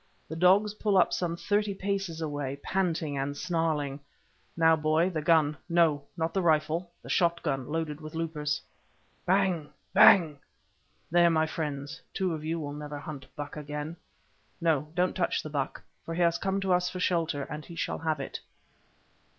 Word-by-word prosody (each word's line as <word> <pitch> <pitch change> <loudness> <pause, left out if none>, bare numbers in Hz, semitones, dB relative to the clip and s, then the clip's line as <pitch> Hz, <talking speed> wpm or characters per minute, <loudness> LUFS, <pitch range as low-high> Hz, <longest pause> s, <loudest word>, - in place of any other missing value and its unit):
The 160 - -6
dogs 190 +5 +4
pull 210 -2 +1
up - - +4
some 170 -1 -1
thirty 205 +1 0
paces 195 -4 -2
away, 145 -3 -3
panting 165 -6 -1
and 140 +1 -2
snarling. 155 -5 -1 0.6
Now, 165 -1 +6
boy, 160 +3 +2
the 160 -3 -2
gun—no, 155 0 +2
not 165 0 -1
the 190 - +1
rifle, 160 +1 +1
the - - -10
shot 170 -1 +2
gun 135 -5 -1
loaded 160 -2 -2
with 155 +1 -8
loopers. 150 -4 -2 0.7
Bang! 185 -5 +2 0.2
bang! 160 -7 +7 0.7
there, 175 0 +6
my 160 -1 +3
friends, 150 -1 -4
two 185 -3 0
of 155 -1 -5
you 165 +1 -2
will 145 -2 -5
never 150 0 -6
hunt 145 -2 -8
buck 145 -1 -6
again. 150 +2 -5 0.6
No, 155 -3 +1
don't 180 +1 +1
touch 180 - 0
the 155 - -7
buck, 140 -2 -3 0.2
for 165 - -5
he 175 - -1
has 170 0 +2
come 195 0 0
to 190 -1 +2
us 180 0 +2
for 185 - -6
shelter, 165 -5 0
and 150 +2 -6
he 170 - -10
shall - - -2
have 160 -2 -1
it. 135 - -5
160 Hz, 170 wpm, -29 LUFS, 150-175 Hz, 0.7 s, bang